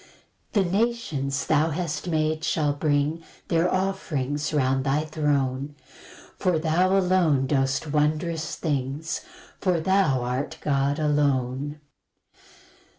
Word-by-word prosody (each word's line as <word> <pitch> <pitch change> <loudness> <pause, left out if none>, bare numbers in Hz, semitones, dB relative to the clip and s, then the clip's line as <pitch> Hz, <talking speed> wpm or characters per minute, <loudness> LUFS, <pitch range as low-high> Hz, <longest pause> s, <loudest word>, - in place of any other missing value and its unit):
2 200 - +3
The 175 - -3
nations 190 - 0
thou 155 +1 +3
hast 165 0 -3
made 155 -1 0
shall 150 -2 +1
bring 145 +2 0 0.3
Their 170 +1 +2
offerings 155 -7 -1
round 135 -3 +1
thy 145 +3 +1
throne; 145 -2 -1 0.6
For 180 -3 +2
thou 175 +4 +2
alone 180 -8 +3
dost 135 +2 0
wondrous 155 +2 0
things, 145 0 -2 0.4
For 180 -3 +1
thou 160 -7 +2
art 125 +3 -3
God 140 0 +1
alone. 145 -1 0
150 Hz, 110 wpm, -25 LUFS, 140-165 Hz, 0.6 s, 2